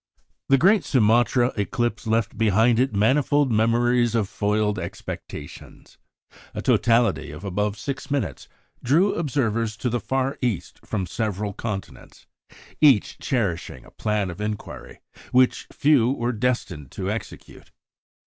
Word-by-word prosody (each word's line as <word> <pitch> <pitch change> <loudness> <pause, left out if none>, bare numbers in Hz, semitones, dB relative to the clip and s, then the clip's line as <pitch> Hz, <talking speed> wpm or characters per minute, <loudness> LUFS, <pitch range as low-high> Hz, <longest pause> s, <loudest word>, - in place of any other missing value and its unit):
" - - -49
The 135 - +6
great 190 +6 +4
Sumatra 120 +1 +3
eclipse 120 +2 -2
left 110 -1 0
behind 110 +2 +3
it 130 +1 +2
manifold 135 +5 +2
memories 120 +1 +2
of 110 -4 +1
foiled 105 +1 0
expectations. - - -9 0.6
A - - -3
totality 115 -3 +2
of 75 +7 -9
above 105 +2 -1
six 140 +3 -5
minutes 140 -4 -3 0.4
drew 170 +11 +3
observers 115 -8 -1
to 125 +2 -2
the 120 - 0
Far 135 +3 -2
East 120 -8 -2
from 100 -4 -3
several 105 +1 -3
continents, 95 - -7 0.6
each 135 -9 +4
cherishing 100 - -2
a - - -16
plan 105 -3 -1
of 85 - -9
inquiry 105 -1 -6 0.3
which 130 0 +3
few 140 -5 +3
were 120 -2 -2
destined 105 - -2
to - - -3
execute. - - -8
115 Hz, 130 wpm, -24 LUFS, 105-130 Hz, 0.6 s, The